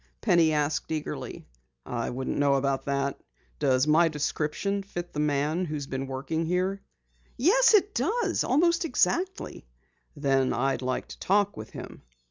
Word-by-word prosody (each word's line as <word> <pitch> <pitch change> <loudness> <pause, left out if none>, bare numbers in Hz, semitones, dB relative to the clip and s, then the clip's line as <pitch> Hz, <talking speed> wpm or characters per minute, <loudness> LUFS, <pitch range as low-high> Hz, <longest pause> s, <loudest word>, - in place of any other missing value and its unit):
Penny 165 - +4
asked 150 0 -1
eagerly. 155 -2 -5 0.4
"I 115 -1 -3
wouldn't 130 +3 -3
know 140 -1 +4
about 135 0 0
that. 140 0 -1 0.4
Does 130 -2 +3
my 160 +3 +5
description 155 +6 -2
fit 175 -3 -7
the 150 - -3
man 150 +4 +1
who 155 -2 -4
has 145 -2 -4
been 135 0 -4
working 140 +5 -3
here?" 185 +3 0 0.6
"Yes, 435 - +5
it 405 0 +3
does! 425 - 0
Almost 340 +5 +2
exactly." 345 - -1 0.5
"Then 135 -2 +1
I'd 135 +3 0
like 130 0 -2
to - - -10
talk 205 +1 +2
with 110 0 -8
him." - - -9
150 Hz, 150 wpm, -27 LUFS, 140-200 Hz, 0.6 s, my